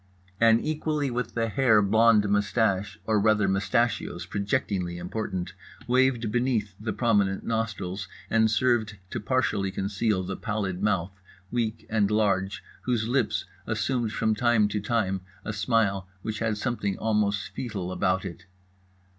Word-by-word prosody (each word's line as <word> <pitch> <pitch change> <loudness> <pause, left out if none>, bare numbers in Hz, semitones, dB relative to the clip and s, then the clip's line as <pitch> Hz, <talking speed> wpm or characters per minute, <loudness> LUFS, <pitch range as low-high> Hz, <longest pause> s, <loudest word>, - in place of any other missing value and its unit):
An 115 0 +6
equally 150 -2 -1
with 120 -1 -3
the 115 -1 +1
hair 115 -2 +4
blond 105 +1 +4
moustache—or 105 0 +1
rather 105 -1 +3
mustachios 105 +5 0
projectingly 100 -4 -1
important—waved 110 +6 -1
beneath 120 -5 0
the 110 +1 -3
prominent 100 -3 +1
nostrils, 100 -4 -2 0.2
and 110 +1 +3
served 110 -3 +1
to - - -2
partially 105 -4 0
conceal 100 +1 -1
the 95 +1 -4
pallid 100 -4 -3
mouth, 95 -2 -1 0.3
weak 115 -2 -2
and 105 -2 +2
large, 100 -2 +1 0.2
whose 120 -3 0
lips 125 -2 0 0.2
assumed 120 -5 0
from 110 0 +1
time 110 -1 +3
to 105 - -1
time 100 -3 0 0.2
a 105 - -3
smile 100 -3 +1 0.2
which 110 -1 -3
had 110 -2 0
something 105 -4 -2
almost 105 -2 0
foetal 100 -8 -4
about 95 0 0
it. 85 - -8
105 Hz, 130 wpm, -27 LUFS, 100-115 Hz, 0.3 s, An